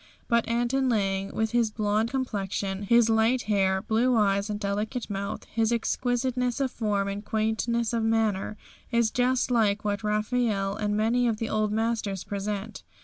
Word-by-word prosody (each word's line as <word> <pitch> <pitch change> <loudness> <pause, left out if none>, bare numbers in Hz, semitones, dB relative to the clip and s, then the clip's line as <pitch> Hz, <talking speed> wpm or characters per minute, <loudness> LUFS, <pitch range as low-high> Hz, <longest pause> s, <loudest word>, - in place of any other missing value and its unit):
But 235 -1 +2
Anton 240 +3 +1
Lang, 195 -3 0
with 220 -1 -1
his 235 -2 +2
blonde 215 +1 0
complexion, 200 -6 -2
his 235 +3 +4
light 225 +3 +2
hair, 195 -2 +1
blue 240 +3 +2
eyes 200 -1 +2
and 205 0 -3
delicate 210 +3 -3
mouth, 200 0 -4
his 225 0 0
exquisiteness 245 +1 0
of 270 -2 0
form 205 -4 -1
and 200 +1 -4
quietness 220 +2 0
of 230 - +1
manner, 220 -2 0 0.3
is 235 -2 +2
just 255 0 +1
like 210 -3 +2
what 205 +1 -1
Raphael 210 -2 0
and 210 -1 -1
many 235 +3 +2
of 225 -2 0
the 225 0 -3
old 215 -1 0
masters 220 -3 -1
present. 205 +1 -4
220 Hz, 160 wpm, -27 LUFS, 205-235 Hz, 0.3 s, his